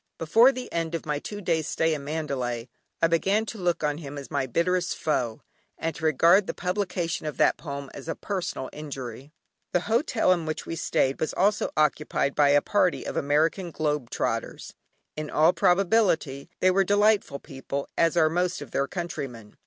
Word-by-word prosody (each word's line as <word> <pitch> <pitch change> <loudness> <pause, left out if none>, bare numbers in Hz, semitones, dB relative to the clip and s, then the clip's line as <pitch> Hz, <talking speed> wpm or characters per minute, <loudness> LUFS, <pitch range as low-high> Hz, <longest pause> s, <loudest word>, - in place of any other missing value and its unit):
Before 225 +11 +5
the 255 -2 -7
end 165 0 -1
of 165 - -5
my 150 -1 -1
two 205 +6 -7
days 165 -4 0
stay 160 0 +1
in 145 -2 -4
Mandalay 135 -6 -3 0.3
I - - +7
began 195 +6 +1
to 220 -1 -7
look 175 -3 0
on 150 0 0
him 145 -2 -8
as 140 - -8
my 140 -2 0
bitterest 180 +6 0
foe, 120 -7 -1 0.3
and 165 0 -2
to - - -10
regard 170 +6 +5
the - - -3
publication 180 -3 -2
of 150 - -5
that - - +4
poem 140 -3 -7
as - - -9
a 165 - -2
personal 185 -9 -4
injury. 135 -3 -7 0.4
The 180 - +3
Hotel 225 - +1
in 170 -3 -3
which 155 - -3
we 165 - -4
stayed 135 -3 0
was 155 - -2
also 205 +3 +2
occupied 150 -2 +1
by 145 -1 +4
a 145 0 +4
party 185 -4 +1
of - - -4
American 155 +6 +1
"Globe 150 -5 -2
Trotters." - - -3 0.4
In 155 -1 -5
all 160 +3 +4
probability 180 -7 +2
they 185 - +5
were 195 +1 +3
delightful 205 -6 +2
people, 140 -1 -6
as 165 +1 +2
are 160 -2 +5
most 180 +2 0
of 135 - -14
their 140 - 0
countrymen. 135 - -6
160 Hz, 185 wpm, -26 LUFS, 145-180 Hz, 0.4 s, I